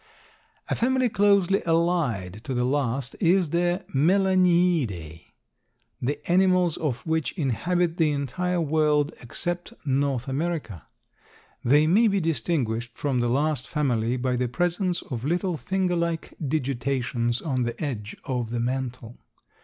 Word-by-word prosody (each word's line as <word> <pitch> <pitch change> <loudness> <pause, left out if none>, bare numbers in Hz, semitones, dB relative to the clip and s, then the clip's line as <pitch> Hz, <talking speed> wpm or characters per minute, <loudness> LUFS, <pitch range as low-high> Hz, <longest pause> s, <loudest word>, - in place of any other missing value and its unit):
A - - -1
family 255 +1 +2
closely 200 -2 +3
allied 160 - 0
to 135 - -3
the 125 - +1
last 135 -1 -1
is 180 -3 +3
the 175 +2 0
Melaniidae, 170 - +2 0.8
the 145 +4 -1
animals 185 -2 +3
of 130 -7 -3
which 160 -1 -1
inhabit 170 - 0
the 160 -2 +3
entire 150 +6 -1
world, 150 -2 +2
except 175 - -4
North 135 -2 0
America. 135 - -3 0.8
They 145 +5 +5
may 205 +9 +4
be 200 -1 +2
distinguished 120 -7 -1
from 135 -4 0
the 120 0 +1
last 145 +1 0
family 125 -5 0
by 125 0 0
the 125 0 0
presence 175 - -1
of 120 -4 -6
little 175 +4 0
finger 185 +2 -1
like 170 -1 -2
digitations 130 -4 -1
on 130 -5 0
the 120 -1 -3
edge 115 -9 -4
of 125 -4 -2
the 120 0 -2
mantle. 125 -1 -3
150 Hz, 130 wpm, -25 LUFS, 125-175 Hz, 0.8 s, They